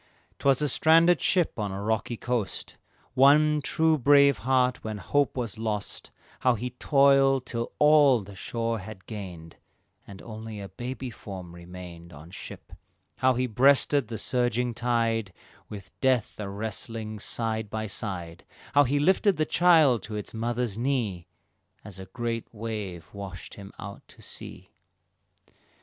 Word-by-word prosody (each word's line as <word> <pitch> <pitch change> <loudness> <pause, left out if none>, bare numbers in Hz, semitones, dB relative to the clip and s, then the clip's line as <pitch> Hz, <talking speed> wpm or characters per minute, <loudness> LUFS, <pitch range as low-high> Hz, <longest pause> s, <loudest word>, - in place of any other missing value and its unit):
'Twas 140 +1 +3
a - - +2
stranded 165 +5 +4
ship 180 -10 +1
on 105 -2 -2
a 95 - -5
rocky 110 +2 -1
coast, 120 -5 -3 0.4
One 150 +3 +5
true 160 +3 +1
heart 130 - -13
brave, 130 -3 +4
when 110 -1 -4
hope 140 +8 0
was 115 -3 -4
lost, 105 -2 -4 0.3
How 125 -2 +3
he 125 +3 -4
toiled 135 0 +3
till 115 -1 -4
all 150 -5 +5
the 100 +1 -11
shore 115 +3 -3
had 95 -1 -10
gained, 90 -7 -8 0.5
And 100 -1 -11
only 110 -1 -8
a 100 -1 -7
baby 125 +5 -6
form 95 -5 -9
remained 85 -1 -11
On 75 +4 -12
ship, 95 - -10 0.4
how 130 -1 +3
he 130 +1 0
breasted 135 +3 +3
the 115 - -5
surging 125 0 0
tide 115 -4 0 0.4
With 100 -2 -9
Death 130 -6 +1
a 100 -2 -4
wrestling 110 +1 -5
side 110 0 -3
by 110 +1 -3
side, 90 -5 -6 0.3
How 145 +1 +6
he 140 +3 +1
lifted 190 +5 +3
the 155 - +1
child 155 - +4
to 105 +2 -7
its 105 - -6
mother's 115 -1 -2
knee, 115 -10 -1 0.6
As 100 -3 -10
a 95 - -7
great 115 +3 -4
wave 105 -6 -6
washed 100 -2 -8
him 100 -1 -10
out 100 0 -9
to - - -16
sea. - - -10
115 Hz, 150 wpm, -27 LUFS, 100-130 Hz, 0.6 s, How